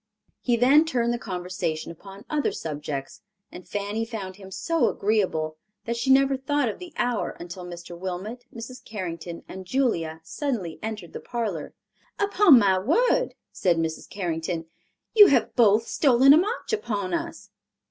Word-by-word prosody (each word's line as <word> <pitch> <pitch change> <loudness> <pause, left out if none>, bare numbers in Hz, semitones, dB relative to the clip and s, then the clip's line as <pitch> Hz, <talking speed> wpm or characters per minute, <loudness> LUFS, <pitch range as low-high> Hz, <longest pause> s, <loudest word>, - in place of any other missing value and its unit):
He 240 -2 +2
then 270 +6 +6
turned 240 -7 0
the 240 - -3
conversation 180 -5 -3
upon 195 +4 -12
other 300 -1 0
subjects, 150 +1 -5 0.3
and 180 - -11
Fanny 205 +2 -2
found 205 -5 -6
him 195 -2 -11
so 315 - +1
agreeable 185 -7 0 0.3
that 235 - -1
she 235 +3 -2
never 270 +1 +5
thought 285 0 0
of 215 - -4
the 360 -2 -9
hour 245 -3 -1
until 175 +1 -8
Mr. 175 0 -8
Wilmot, 190 +7 -5
Mrs. 235 +2 -9
Carrington 175 -5 -6
and 190 0 -8
Julia 175 -10 0
suddenly 215 - -3
entered 215 -6 -6
the - - -5
parlor. 210 -11 -4 0.4
"Upon 405 -7 +6
my 195 -4 +4
word," 485 - +2 0.2
said 175 -3 +1
Mrs. 160 -1 -3
Carrington, 165 -3 -3 0.5
"you 415 -3 +10
have 280 - +2
both 225 -2 +5
stolen 270 0 +5
a - - +7
march 425 +7 -1
upon 205 - -2
us." 335 0 -4
210 Hz, 155 wpm, -25 LUFS, 175-265 Hz, 0.5 s, you